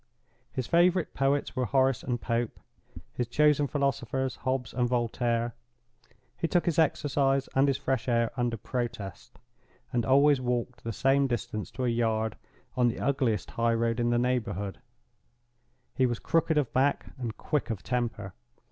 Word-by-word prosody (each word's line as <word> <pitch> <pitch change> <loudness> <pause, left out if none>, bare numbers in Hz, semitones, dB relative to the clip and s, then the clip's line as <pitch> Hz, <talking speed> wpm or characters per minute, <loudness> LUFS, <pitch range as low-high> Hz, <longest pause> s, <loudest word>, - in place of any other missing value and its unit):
His 130 - -3
favorite 175 +3 +3
poets 140 +1 0
were 130 - 0
Horace 130 -1 +2
and 125 -2 -2
Pope; 115 0 -2 0.5
his 120 - -2
chosen 150 +3 +3
philosophers, 135 -2 -1
Hobbes 130 -2 -2
and 125 -1 +1
Voltaire. 120 -1 0 0.8
He 165 - -1
took 175 +1 +1
his 170 -1 +1
exercise 140 -3 +2
and 135 +1 +4
his 135 -2 +2
fresh 135 -3 -1
air 115 -1 +2
under 120 -2 -1
protest; 115 -4 -5 0.6
and 120 -1 +1
always 140 +3 +4
walked 125 0 -2
the 115 - -3
same 135 +4 +2
distance 110 -3 -3
to 130 - -2
a - - +1
yard, 110 -2 0 0.4
on 125 -1 +3
the 120 - -1
ugliest 130 -5 0
high 115 0 +1
road 115 +1 0
in 120 0 +2
the 120 - +2
neighborhood. 120 -6 -1 1.1
He 130 - +2
was 120 -1 -1
crooked 165 +2 +1
of 145 -5 0
back, 140 +2 +2
and 115 -3 -4
quick 150 -4 -1
of 110 -4 -4
temper. 120 -6 -2
125 Hz, 155 wpm, -28 LUFS, 115-135 Hz, 1.1 s, and